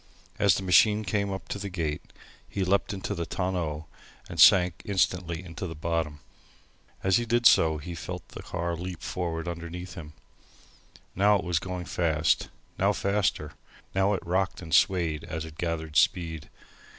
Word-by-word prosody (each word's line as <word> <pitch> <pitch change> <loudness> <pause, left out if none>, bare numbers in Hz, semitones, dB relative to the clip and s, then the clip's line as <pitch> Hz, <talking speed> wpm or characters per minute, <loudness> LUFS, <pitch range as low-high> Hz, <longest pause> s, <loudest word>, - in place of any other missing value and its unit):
As 100 -5 +5
the 95 - -3
machine 105 +3 +4
came 100 0 0
up 95 - -6
to 100 - -3
the 100 0 -4
gate, 80 -5 -4 0.4
he 100 - -2
leapt 95 +2 +1
into 100 0 -4
the 85 -4 -4
tonneau 85 -5 -2 0.4
and 85 - -8
sank 90 -1 +6
instantly 90 -3 0
to 90 - -5
the 80 - -7
bottom. 80 -2 -2 0.8
As 95 -1 +4
he 120 - -1
did 120 +1 +1
so 80 -7 +6
he 80 +4 -7
felt 90 +1 -7
the - - -9
car 85 -1 -3
leap 90 0 -6
forward 85 -2 -3
underneath 85 +1 -6
him. 75 -2 -9 1.0
Now 105 +2 +4
it - - -4
was 85 -2 0
going 90 0 -5
fast, 80 -3 +1 0.3
now - - +3
faster, 100 -6 0 0.4
now 95 +2 +2
it 95 - -6
rocked 95 +2 0
and 80 -4 -7
swayed 85 -3 +3
as 80 0 -5
it 80 0 -12
gathered 80 -3 -3
speed. 80 0 +1
90 Hz, 165 wpm, -27 LUFS, 80-95 Hz, 1.0 s, sank